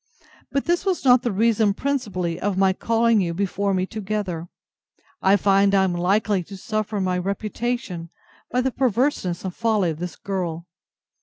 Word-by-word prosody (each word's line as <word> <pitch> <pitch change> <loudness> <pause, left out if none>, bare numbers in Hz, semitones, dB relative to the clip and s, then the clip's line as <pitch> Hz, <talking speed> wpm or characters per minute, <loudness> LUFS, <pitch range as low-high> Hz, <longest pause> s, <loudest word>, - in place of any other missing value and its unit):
But 275 0 0
this 345 +1 +1
was 375 -7 -1
not 250 -1 +6
the 240 - -1
reason 215 0 +2
principally 205 -12 -2
of 200 -1 -1
my 190 -1 +4
calling 230 +1 +2
you 170 -2 -2
before 200 +1 -1
me 185 -1 +1
together. 195 -5 -4 0.7
I 195 +1 +5
find 195 +1 +3
I 190 - +4
am 185 -2 +1
likely 195 +3 +1
to 195 +2 -9
suffer 215 +1 -3
in 195 - 0
my 180 -1 0
reputation 200 -2 -3 0.4
by 250 - +1
the 265 +1 0
perverseness 245 -8 0
and 185 - -3
folly 215 -6 +1
of 155 - -7
this 180 -1 -5
girl. 175 -4 -4
200 Hz, 170 wpm, -23 LUFS, 185-230 Hz, 0.7 s, not